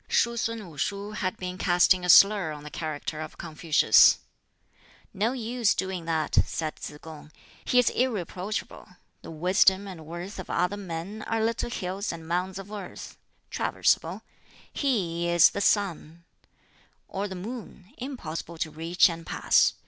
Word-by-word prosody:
Shuh 235 0 +2
sun 230 -3 -3
Wu 155 -4 -12
shuh 200 +5 -2
had 185 -3 -3
been 180 0 -6
casting 180 0 +4
a 180 - -3
slur 195 -3 +7
on 150 -1 -10
the 150 - -9
character 155 -1 -4
of 155 - -8
Confucius. 160 -1 +5 1.0
"No 220 +5 0
use 240 -2 0
doing 185 -3 -3
that," 160 -2 -1
said 155 -2 -4
Tsz 150 - -7
kung; 155 -1 -11 0.3
"he 250 - +1
is 250 - +5
irreproachable. 210 -4 -3 0.3
The - - -10
wisdom 190 +4 +3
and 165 -5 -9
worth 175 +4 -7
of 185 - -8
other 180 +4 0
men 195 +2 -6
are 225 -1 0
little 230 +1 -1
hills 195 -1 -3
and 165 -1 -9
mounds 180 +2 -1
of 195 +1 -9
earth: 205 -4 -8 0.4
traversible. - - 0 0.5
He 175 - 0
is 170 -1 +6
the 200 - -3
sun, 170 -5 0 0.8
or 195 +1 -3
the 190 - -7
moon, 210 0 -8
impossible 170 - -6
to 160 0 -3
reach 165 +3 +3
and 165 -2 -5
pass. - - +3
185 Hz, 155 wpm, -27 LUFS, 165-205 Hz, 1.0 s, slur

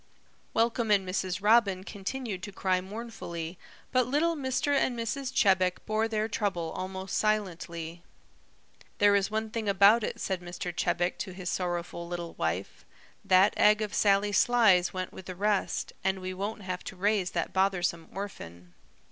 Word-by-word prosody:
Welcome 230 0 +1
and 200 -3 +3
Mrs. 185 0 -2
Robin 205 -4 +4
continued 205 +1 -5
to 205 +2 -6
cry 185 -1 0
mournfully, 185 -5 -6 0.3
but 255 -2 +2
little 315 +6 +1
Mr. 270 0 0
and 255 -3 +1
Mrs. 255 +3 -3
Chebec 185 -2 +3
bore 220 +1 +1
their 215 -1 -1
trouble 195 -7 -2
almost 190 +1 -4
silently. 170 -5 -2 1.0
"There 205 0 +5
is 200 -1 +2
one 220 0 -2
thing 220 -2 -2
about 200 +4 +6
it," - - -3
said 190 -2 -2
Mr. 175 0 -6
Chebec 175 +1 0
to 185 - -4
his 180 -1 -4
sorrowful 175 -1 -3
little 170 -1 -5
wife, 85 +4 -3 0.4
"that 190 +1 +5
egg 210 +1 +5
of 210 - -5
Sally 200 0 +3
Sly's 205 -5 +4
went 185 0 -4
with 190 - -10
the 185 - -6
rest, 205 +1 0
and 190 0 +1
we 185 0 -4
won't 205 +3 -4
have 185 -1 -4
to - - -7
raise 200 -1 +1
that - - -1
bothersome 180 -3 0
orphan." 90 - -8
195 Hz, 160 wpm, -29 LUFS, 180-215 Hz, 1.0 s, about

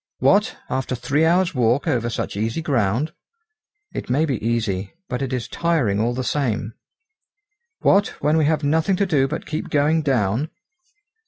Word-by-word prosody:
"What! - - +3
after 130 0 -2
three 140 +6 +1
hours' 180 +2 +3
walk 125 0 +1
over 120 -2 +1
such 115 - -3
easy 110 +10 -2
ground." 130 +1 0 0.8
"It - - -5
may 145 +6 +2
be 130 -8 -2
easy, 105 -5 -1
but 125 0 -3
it 135 -1 -2
is 125 -2 -2
tiring 135 -9 0
all 120 +2 0
the 130 - -2
same." 120 -6 -1 1.1
"What, 200 +1 +4
when 150 +1 +2
we 160 -2 +3
have 155 0 +1
nothing 160 +6 +2
to 200 - +1
do 145 -7 +2
but - - -5
keep 155 - -4
going 150 +2 +2
down!" 130 0 0
135 Hz, 165 wpm, -22 LUFS, 115-155 Hz, 1.1 s, What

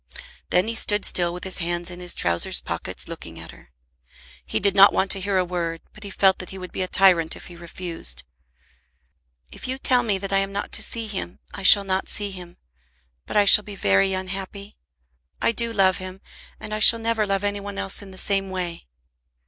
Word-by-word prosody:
Then 180 +4 +2
he 230 - -2
stood 210 -2 +1
still 175 -1 +2
with 180 +1 -8
his 190 0 -4
hands 175 0 -2
in 175 - -9
his 180 -1 -4
trowsers 85 0 +1
pockets - - -6
looking 80 0 -9
at 80 0 -10
her. - - -19 0.7
He - - -2
did 200 0 +1
not 195 +1 +7
want 190 - 0
to 195 - +3
hear 195 0 -1
a 185 - +1
word, 170 -2 -4
but 215 - -13
he 200 - -7
felt 190 -1 +2
that 185 - -7
he 190 - -8
would 180 -1 -9
be - - -4
a 185 - -1
tyrant 180 -4 +4
if - - -12
he 175 - -12
refused. 170 - -3 1.3
"If - - -9
you 260 +1 -3
tell 255 -2 +4
me 215 -5 0
that 195 0 -5
I 195 - +4
am 195 0 -2
not 200 +1 -5
to - - -1
see 230 -1 -3
him, 195 -4 -6 0.2
I 200 - -8
shall 200 +1 +8
not 190 0 -2
see 205 -1 -4
him. 180 -2 -10 0.7
But - - -2
I 205 - +5
shall 210 +1 +8
be 205 -1 -9
very 100 - +2
unhappy. 195 +2 -6 0.6
I - - +2
do 230 +1 -1
love 190 -4 +2
him, 185 0 -9 0.4
and 210 - -8
I 215 - -2
shall 230 +2 +6
never 225 -2 -1
love 195 0 -1
any 205 0 -2
one 200 0 -8
else 195 - -2
in 200 - -11
the 190 - -13
same 195 0 +1
way." 175 - -5
190 Hz, 220 wpm, -23 LUFS, 180-205 Hz, 1.3 s, shall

